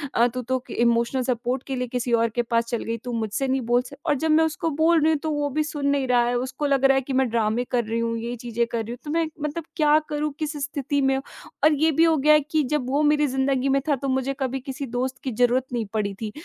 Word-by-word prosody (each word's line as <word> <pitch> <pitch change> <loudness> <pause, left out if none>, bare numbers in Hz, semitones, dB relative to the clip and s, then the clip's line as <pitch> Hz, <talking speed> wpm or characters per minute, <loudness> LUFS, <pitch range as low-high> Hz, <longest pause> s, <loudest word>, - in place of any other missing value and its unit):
अ, 235 +1 +5
"तू 250 +1 -4
तो 260 +2 -1
के - - -7
इमोशनल 235 +2 +2
सपोर्ट 250 +1 -2
के 270 - -2
लिए 250 -1 -2
किसी 245 -1 -1
और 230 0 +3
के 240 +2 -1
पास 230 0 0
चल 235 - -2
गई, 230 0 -3
तू 245 +2 -7
मुझसे 225 +4 -2
नहीं 265 0 0
बोल 245 +1 +4
सक" 255 +3 -11
और - - +2
जब 315 +3 0
मैं 320 +1 +5
उसको 320 +1 -1
बोल 330 0 +4
रही 310 - +4
हूँ, 310 - +2
तो 315 - -3
वो 290 -1 -1
अभी 305 +3 0
सुन 295 -2 -3
नहीं 280 -2 +1
रहा 245 -1 +4
है, 245 - 0
उसको 260 +4 -3
लग 275 -1 +2
रहा 270 0 +5
है 270 - +2
कि 270 +1 -5
मैं 260 0 +2
ड्रामे 225 +1 0
कर 245 -1 +2
रही 230 +1 -2
हूँ, 230 0 -1
ये 235 +2 -4
चीज़ें 235 0 -2
कर 230 -1 -1
रही 225 - -7
हूँ, 240 - -6
तो 295 - -4
मैं 330 0 +1 0.2
मतलब 300 +3 -3
क्या 300 -1 +4
करूँ, 300 0 -1
किस 310 -1 -3
स्थिति 285 -1 -1
में 270 0 +2 0.5
और 305 +1 +6
ये 320 - +4
भी 320 +2 +3
हो 325 -1 +4
गया 300 +3 +5
है 300 - +6
कि 310 +1 0
जब 280 -4 0
वो 280 +3 +1
मेरी 295 0 +3
ज़िंदगी 265 0 0
में 275 0 +2
था, 290 - +4
तो 275 +1 -5
मुझे 265 +1 0
कभी 265 0 -2
किसी 270 +1 -6
दोस्त 260 +1 -2
की 260 - -2
ज़रूरत 245 +3 +2
नहीं 235 -2 -1
पड़ी 205 -2 -1
थी 215 -2 -3
265 Hz, 290 wpm, -24 LUFS, 240-295 Hz, 0.5 s, और